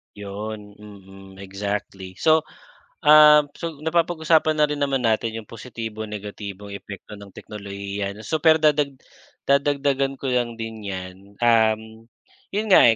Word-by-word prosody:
'Yon, 105 +1 -7
mm 95 -2 -14
exactly. 100 -1 -5
So, 160 -1 +4 0.6
um, 150 -1 +7
so 165 +2 -6
napapag-usapan 160 -1 +2
na 150 - +3
rin 145 0 -3
naman 135 -2 0
natin 115 0 +1
'yong 115 - -5
positibong 115 -2 -7
negatibong 105 -1 -7
epekto 100 +1 -9
ng 100 -1 -12
teknolohiya. 100 -1 -6
Super 160 0 +3
dadag 150 -3 +2 0.5
dadagdagan 140 -1 +1
ko 135 -1 -3
lang 120 -2 0
din 110 -2 -7
'yan, 95 -1 -5 0.2
um, 110 -1 +1 0.4
'yon 215 +2 -1
nga 180 - +8
110 Hz, 125 wpm, -23 LUFS, 100-145 Hz, 0.6 s, nga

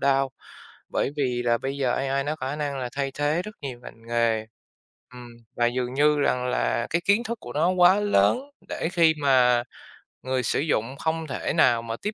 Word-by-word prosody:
đao, 135 -1 +2 0.6
bởi - - 0
vì 125 -3 0
là 120 -1 +2
bây 135 +3 -4
giờ 130 -3 +1
AI 135 +1 -1
nó 150 +2 -2
có 130 - -5
khả 145 - -3
năng 145 -2 -3
là 125 -1 -4
thay 140 -1 -1
thế 145 +3 0
rất 210 +3 -9
nhiều 130 -4 -6
ngành 115 -1 -13
nghề. 115 -2 +1 0.7
Ừm, 125 -1 -10 0.3
và 120 - +2
dường 125 0 -2
như 150 +2 +3
rằng 125 -3 +1
là 120 -1 0
cái 170 +1 0
kiến 205 +4 +3
thức 235 -1 -5
của 120 - -9
nó 160 +4 +2
quá 185 +2 +5
lớn 205 - +3 0.3
để - - -2
khi 165 -2 +5
mà 125 -3 +4 0.6
người 130 -1 -1
sử - - 0
dụng 135 -4 -1
không 160 0 -2
thể 135 - -3
nào 120 -8 +4
mà 115 -1 -5
tiếp 210 +1 -2
135 Hz, 210 wpm, -25 LUFS, 125-155 Hz, 0.7 s, quá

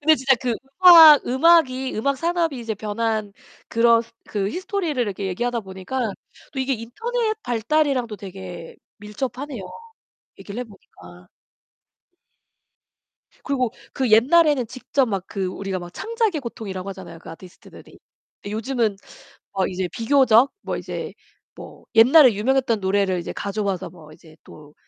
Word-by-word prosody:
근데 315 +1 +5
진짜 265 -1 +2
그 245 -3 -1 0.3
음악 325 -4 +9
음악이 265 -1 +3
음악 280 +5 0
산업이 335 -4 -1
이제 230 -2 -4
변한 215 0 -3 0.4
그런 230 0 +3 0.2
그 200 -2 -2
히스토리를 365 - -3
이렇게 200 -4 -2
얘기하다 235 +5 -2
보니까 190 +6 -6 0.5
또 275 - -6
이게 260 +1 -1
인터넷 435 - -3
발달이랑도 245 -1 0
되게 185 -4 -10 0.2
밀접하네요. 245 +3 -6 0.8
얘기를 210 +4 -7
해 - - -4
보니까. 90 - -17 2.2
그리고 255 -5 -1 0.2
그 260 -3 -1
옛날에는 280 +3 +4
직접 255 +2 -1
막 195 -4 -3
그 195 -2 -3
우리가 190 0 -4
막 175 0 -10
창작의 450 -7 -1
고통이라고 200 -6 -7
하잖아요, 185 -3 -10
그 - - -13
아티스트들이. 175 +2 -14 0.4
근데 205 - -7
요즘은 225 -1 -1 0.6
어 190 -1 0
이제 185 0 -3
비교적 255 0 +3
뭐 - - -4
이제 - - -6 0.4
뭐 - - -12
옛날에 250 +2 +7
유명했던 240 +1 0
노래를 190 -1 0
이제 170 - -6
가져와서 200 -2 -3
뭐 155 -4 -16
이제 155 0 -18
또 150 -1 -15
230 Hz, 320 characters per minute, -22 LUFS, 195-270 Hz, 2.2 s, 음악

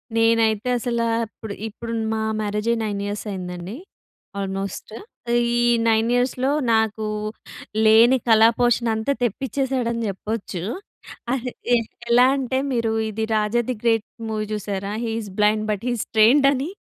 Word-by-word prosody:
నేనైతే 225 0 +2
అసల, 235 -1 -1 0.3
ఇప్పుడు, 220 -3 -8
ఇప్పుడు 230 +2 -7 0.2
మా 220 - -1 0.2
మ్యారేజ్ 210 +1 -2
అయి 235 - +1
9 205 -2 -2
ఇయర్స్ 205 +1 -4
అయిందండి 180 +1 -6 0.6
ఆల్మోస్ట్. 195 +1 -4 0.6
ఈ - - +2 0.3
9 225 +1 +3
ఇయర్స్‌లో 255 +2 +1 0.2
నాకు 220 -1 +1 0.8
లేని 230 +4 +6
కళా 225 0 +7
పోషణ 240 -1 +2
అంతా 220 +6 0
తెప్పించేసాడని 250 0 -1
చెప్పొచ్చు. 195 -2 -4 0.7
అది 250 -1 -2 0.2
ఎ - - +5 0.3
ఎలా 245 +1 +6
అంటే 260 -1 -1
మీరు 230 -2 0 0.2
ఇది 220 +1 -3
'రాజా 215 +2 +2
ది 255 - 0
గ్రేట్ 225 -2 +2 0.2
మూవీ' 215 -1 -2
చూసారా? 200 -1 -3
He 225 - -2
is 205 - -8
blind 215 +1 +3
but 205 +1 -3
he - - +1
is - - -3
trained 255 +6 +6
అని. 280 +4 -2
225 Hz, 145 wpm, -22 LUFS, 210-240 Hz, 0.8 s, కళా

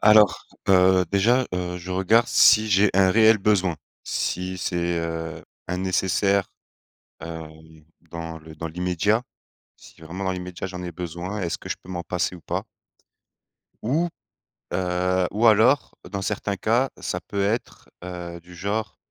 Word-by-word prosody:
Alors, 105 -3 +6 0.2
heu, 95 -1 +5
déjà, 120 +6 +3
heu, 90 0 -3
je 90 +2 -8
regarde 95 +6 +3
si 110 0 +6
j'ai 100 +1 +4
un 95 -1 +5
réel 110 +1 +6
besoin. 95 -5 +2 0.3
Si 90 0 -2
c'est, 85 -1 -1
heu, 80 -1 -4 0.3
un 90 - -1
nécessaire, 95 +1 +1 0.7
heu, 80 -1 -6 0.6
dans 80 0 -6
le 80 0 -13
dans 85 +2 -4
l'immédiat. 90 +6 0 0.5
Si - - -17
vraiment 95 +3 -6
dans 95 - 0
l'immédiat 90 0 -5
j'en 90 -1 -7
ai 90 -1 -5
besoin, 90 +4 -5
est-ce 85 - -2
que - - -10
je - - -2
peux - - -17
m'en 85 -1 -3
passer 90 +1 -1
ou 85 - -14
pas? 70 - -3 1.2
Ou, 155 +10 +1 0.7
heu, 90 0 +1
ou 115 +3 +3
alors, 115 +6 +4 0.2
dans 100 -1 -3
certains 100 0 -2
cas, 120 +7 +2
ça 90 - -3
peut 100 -1 -2
être, 115 +4 -3
heu, 90 -1 -6
du 90 +1 -14
genre 100 +5 -3
95 Hz, 155 wpm, -24 LUFS, 90-105 Hz, 1.2 s, Alors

